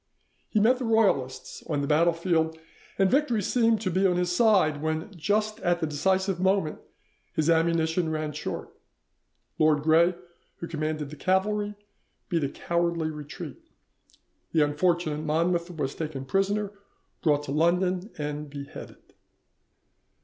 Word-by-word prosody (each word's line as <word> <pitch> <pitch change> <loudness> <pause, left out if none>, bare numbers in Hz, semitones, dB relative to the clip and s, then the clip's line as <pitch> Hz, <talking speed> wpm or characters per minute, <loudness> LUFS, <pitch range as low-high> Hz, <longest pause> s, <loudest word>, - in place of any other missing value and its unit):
He 215 - +2
met 245 +5 +4
the - - -3
Royalists 200 - +1
on 145 -2 0
the 140 - -2
battlefield, 165 +1 +2 0.4
and 195 -1 +3
victory 255 -7 +2
seemed 225 0 +2
to 185 -4 -1
be 190 +3 +3
on 180 - +1
his 180 0 0
side, 185 -10 +3
when 160 +5 -3
just 210 +5 0
at 175 0 +1
the 160 - 0
decisive 190 +5 0
moment 190 -4 +1 0.5
his 155 +1 +2
ammunition 165 0 +2
ran 155 -1 -2
short. 150 - -5 0.9
Lord 155 -2 +3
Gray, 165 +3 +4 0.4
who 170 - -7
commanded 155 -2 -3
the - - -7
cavalry, 205 +4 0 0.5
beat 165 -3 0
a 140 - 0
cowardly 170 0 -1
retreat, 150 -1 -8 0.9
the 155 -2 +4
unfortunate 155 0 0
Monmouth 170 +3 0
was 150 -6 -3
taken 150 -4 -5
prisoner, 195 +5 0 0.5
brought 150 -3 +2
to 140 - -5
London, 180 +5 +1
and 150 0 -4
beheaded. 140 0 -10
170 Hz, 135 wpm, -27 LUFS, 155-190 Hz, 0.9 s, met